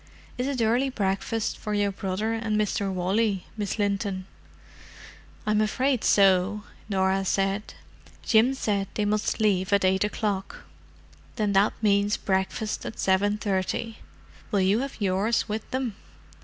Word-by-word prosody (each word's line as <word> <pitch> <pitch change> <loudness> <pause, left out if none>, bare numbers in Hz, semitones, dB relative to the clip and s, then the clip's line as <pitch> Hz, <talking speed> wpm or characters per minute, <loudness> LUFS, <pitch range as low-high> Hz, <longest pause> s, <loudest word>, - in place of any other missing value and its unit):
Is 250 +1 -2
it 265 -4 0
early 245 +5 +2
breakfast 210 0 -2
for 210 -1 -3
your 205 -1 +1
brother 195 +3 -2
and 225 -1 -1
Mr. 200 -1 0
Wally, 195 +2 0
Miss 205 -2 -3
Linton?" 200 -2 -1 1.2
"I'm 215 0 +2
afraid 255 +3 +1
so," 195 +1 +4 0.3
Norah 190 -1 +1
said. 195 +2 -1 0.5
"Jim 240 +4 +4
said 200 -6 -1
they 210 - 0
must 210 +2 0
leave 200 -3 +1
at 200 -1 +3
eight 190 +1 +3
o'clock." 210 -2 -3 0.7
"Then 210 -2 0
that 195 +2 +4
means 205 0 +3
breakfast 190 +3 -1
at - - -6
seven 200 +2 +2
thirty. 210 +2 -2 0.5
Will 200 -3 +1
you 195 +4 +3
have 275 -1 -5
yours 200 +4 +1
with 215 0 -4
them?" 255 -4 -2
205 Hz, 140 wpm, -26 LUFS, 195-220 Hz, 1.2 s, so